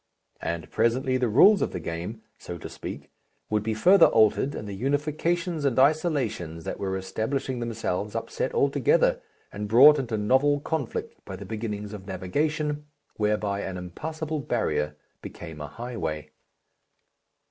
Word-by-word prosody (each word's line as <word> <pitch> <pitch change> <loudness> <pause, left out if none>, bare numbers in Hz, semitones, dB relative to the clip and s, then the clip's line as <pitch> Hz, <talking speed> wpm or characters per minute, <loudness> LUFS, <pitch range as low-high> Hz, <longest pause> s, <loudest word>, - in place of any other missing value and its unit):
And 85 -2 -4
presently 130 +3 +1
the 125 -1 +1
rules 190 - +6
of - - -1
the - - -3
game, 85 +7 -5 0.2
so 90 - -7
to - - -8
speak, - - -8 0.4
would 105 0 +2
be 110 +1 -2
further 185 - +7
altered 110 +5 +3
and 105 - -6
the 100 - -5
unifications 155 +4 0
and 135 -4 +1
isolations 130 - +1
that - - -5
were 95 -1 -2
establishing 115 +7 -2
themselves 105 -3 -3
upset - - -2
altogether - - +3 0.3
and 105 0 -5
brought 140 +7 +8
into 120 -4 -2
novel 135 +7 +3
conflict 145 -3 -4
by - - -7
the - - -8
beginnings 105 -2 -4
of 95 -2 -9
navigation, 150 - -2 0.3
whereby 105 -1 0
an 95 -2 -4
impassable 155 - -4
barrier 75 - -1 0.3
became 80 -3 -9
a 75 - -5
highway. 80 - -5
115 Hz, 145 wpm, -26 LUFS, 100-145 Hz, 0.4 s, brought